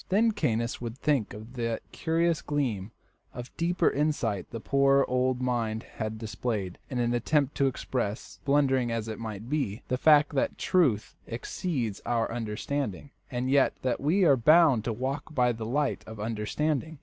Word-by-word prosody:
Then 220 +4 +4
Caius 115 - -1
would 120 0 -5
think 140 -7 +1
of 110 +3 -10
that 115 -2 -2
curious 165 0 +1
gleam 120 -10 -2 0.5
of 125 +1 -8
deeper 170 +2 +1
insight 130 - 0
the 115 - -6
poor 140 +2 +3
old 125 0 +1
mind 115 -3 -1
had 110 -1 -3
displayed 110 -4 -3
in 120 -2 0
the 120 - +2
attempt 140 +3 +1
to 140 - +3
express, 110 -7 -3
blunderingly 135 -3 +2
as 115 -1 -3
it 110 - -5
might 110 -1 -6
be, 130 -6 -2
the 125 - 0
fact 150 0 +5
that 285 - 0
truth 140 - +1
exceeds 120 - -3
our 115 -2 0
understanding, 115 +2 -3 0.2
and 125 +1 -2
yet 140 -1 +4
that 130 -2 0
we 170 +8 +3
are 140 - +6
bound 150 -2 +5
to 120 - 0
walk 135 +6 -4
by 125 -1 +3
the 110 -1 -5
light 145 +4 0
of 110 -1 -9
understanding. 135 +8 -2
125 Hz, 165 wpm, -28 LUFS, 110-145 Hz, 0.5 s, are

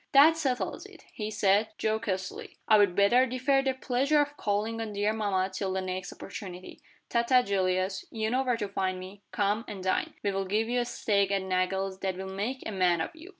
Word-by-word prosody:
"That 295 +4 +8
settles 270 -6 -2
it," - - -17
he 215 -1 -4
said, 205 0 +3
jocosely. 215 -4 -3
"I'd 205 -4 +5
better 240 +6 +5
defer 255 +2 +2
the 270 -1 0
pleasure 270 +4 +1
of 290 0 0
calling 220 0 -1
on 220 -2 -4
dear 205 +1 +1
mamma 195 -3 0
till 190 0 -2
the 190 - 0
next 185 0 -4
opportunity. 185 -3 -9 0.3
Ta 235 - +2
ta, 250 +1 +4
Julius. 190 -1 0
You 220 -1 -2
know 255 +2 +2
where 250 -3 0
to 210 -3 -2
find 190 -1 -1
me. 190 +2 -10
Come, 205 +2 0
and 195 -3 -7
dine. 185 - 0
We'll 195 -1 0
give 215 +4 0
you 245 +1 +1
a 240 - 0
steak 200 -4 +1
at 195 -1 0
Nagle's 190 +1 -1
that 190 -2 -2
will 190 0 -6
make 230 +7 -3
a - - -3
man 180 -3 +2
of 160 - -2
you." 325 +3 -12
205 Hz, 205 wpm, -29 LUFS, 190-240 Hz, 0.3 s, That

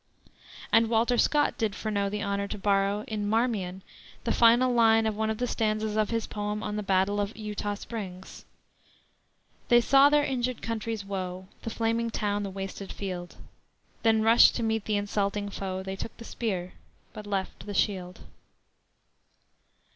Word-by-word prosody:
And 225 0 +5
Walter 235 +1 +2
Scott 295 -1 +2
did 220 -3 0
Freneau 200 -2 -1
the 210 +1 -3
honor 200 0 -1
to 210 - -5
borrow, 200 +1 +1
in 210 -3 -2
Marmion, 210 -5 0 0.4
the - - 0
final 240 +2 +5
line 225 -1 +5
of 220 -1 0
one 220 +1 -1
of 220 - -1
the 245 - -1
stanzas 215 -2 -1
of 215 -1 +1
his 230 -1 -1
poem 210 0 -4
on 210 - -3
the 210 - -2
battle 195 +1 +1
of 205 +2 -3
Eutaw 210 -1 -3
Springs: 190 -5 -8 1.2
"They 240 - +6
saw 275 +4 +6
their 295 0 +4
injured 255 -3 -2
country's 225 -2 -3
woe, 185 -1 -5
The - - -4
flaming 230 +1 0
town, 205 -2 -1
the 200 - -3
wasted 195 0 -6
field; 180 -3 -6 0.7
Then 220 -1 +3
rushed 225 +2 +6
to 235 - -2
meet 220 -1 0
the 210 -1 +1
insulting 205 0 -1
foe; 190 -1 -4
They 190 0 -4
took 225 - -7
the 230 - -10
spear, 185 -8 -3 0.4
but 210 -1 -9
left 195 0 -3
the 205 - -5
shield." 185 -3 -1
210 Hz, 165 wpm, -28 LUFS, 200-225 Hz, 1.2 s, They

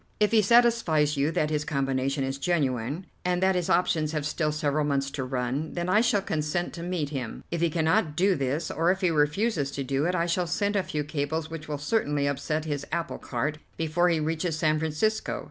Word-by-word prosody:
If 210 0 +3
he 225 -1 +5
satisfies 210 -10 +4
you 140 +2 +1
that 150 0 0
his 150 -1 0
combination 135 -1 -1
is 135 +1 -3
genuine, 140 -1 -1 0.2
and 180 0 +1
that 190 0 +4
his 180 -2 -1
options 160 -3 +2
have 150 -2 -2
still 150 0 0
several 150 0 0
months 140 -1 0
to 140 - -3
run, 130 +4 -2
then 175 0 -2
I 210 +4 +5
shall 205 -4 +2
consent 155 +2 -2
to 170 - -7
meet 170 -4 -2
him. 130 -6 -5
If 170 -1 -2
he 170 - +3
cannot 160 -1 +1
do 190 +3 +3
this, 145 +2 -1
or 165 +2 +2
if 190 +1 -2
he 180 -3 +3
refuses 150 +1 +1
to 140 - -3
do 135 +3 0
it, 180 - 0
I 170 -1 +1
shall 175 +1 0
send 205 +6 0
a 200 - +3
few 150 -5 -3
cables 155 +2 -3
which 160 -1 -7
will 150 -1 -3
certainly 145 -3 0
upset 145 +3 -1
his 145 -2 -2
apple 170 0 -2
cart 145 +5 -3 0.2
before 165 +2 +2
he 165 -2 +2
reaches 160 +1 -1
San 155 -1 +2
Francisco. 160 +8 -1
155 Hz, 215 wpm, -27 LUFS, 145-175 Hz, 0.2 s, he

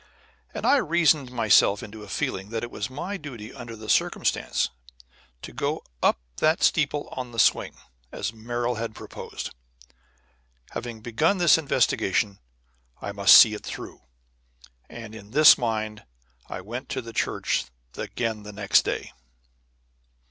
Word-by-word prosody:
And - - -5
I 285 - +5
reasoned 160 - +2
myself 110 -4 +4
into 110 0 -10
a 105 - -11
feeling 95 +1 -3
that 115 0 -3
it 120 - -5
was 105 +2 -4
my 175 +10 -5
duty 125 - -9
under 120 -3 -8
the 110 0 -10
circumstances - - +1 0.7
to - - -8
go - - -2 0.2
up - - +3 0.2
that 155 +1 +2
steeple 145 -1 +1
on 125 -2 -6
the 115 - -10
swing, 110 - +3 0.4
as 110 - -4
Merrill 120 +2 -2
had 115 -1 -4
proposed. - - -8 1.2
Having 115 -2 -6
begun 150 - +1
this 175 -3 +6
investigation, 110 -8 +1 0.6
I - - -5
must 100 -1 +7
see 110 - +8
it 105 - -7
through; - - -8 0.9
and 115 -2 -9
in 105 -2 -11
this 150 +6 +8
mind 110 -3 -3 0.5
I - - -5
went 120 +7 -7
to 130 - -3
the 115 0 -9
church - - -1 0.3
again 110 -3 -3
the 105 0 -9
next 100 -1 +3
day. - - -4
115 Hz, 145 wpm, -25 LUFS, 110-135 Hz, 1.2 s, see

